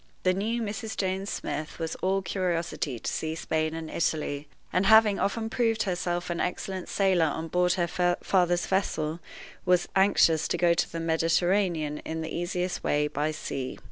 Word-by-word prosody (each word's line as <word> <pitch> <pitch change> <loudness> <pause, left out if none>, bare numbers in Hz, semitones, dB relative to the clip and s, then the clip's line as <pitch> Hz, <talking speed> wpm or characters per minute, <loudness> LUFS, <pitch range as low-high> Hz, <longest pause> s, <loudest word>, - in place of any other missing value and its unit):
The 185 - +3
new 225 +5 -1
Mrs. 215 +1 -4
James 190 +1 -1
Smith 155 +1 -4
was 165 -1 -3
all 190 +1 0
curiosity 170 -8 -2
to - - -4
see 160 0 -2
Spain 155 0 -1
and 165 -1 -5
Italy; 150 -3 -1 0.3
and, 185 +2 +2
having 220 -2 +6
often 220 +2 0
proved 225 -1 +1
herself 175 -1 -2
an 170 - -2
excellent 185 0 -3
sailor 190 -4 +3
on 160 +2 -3
board 180 +1 +2
her 175 0 +1
father's 175 -2 +2
vessel, 165 -4 -1 0.4
was 180 -1 +3
anxious 180 -5 +4
to - - -1
go 170 0 +4
to 170 - 0
the 165 - -4
Mediterranean 165 -1 +1
in 160 0 -5
the 160 - -5
easiest 180 +1 -2
way 150 0 +2
by 150 +1 -1
sea. 135 -4 -4
175 Hz, 170 wpm, -27 LUFS, 160-190 Hz, 0.4 s, having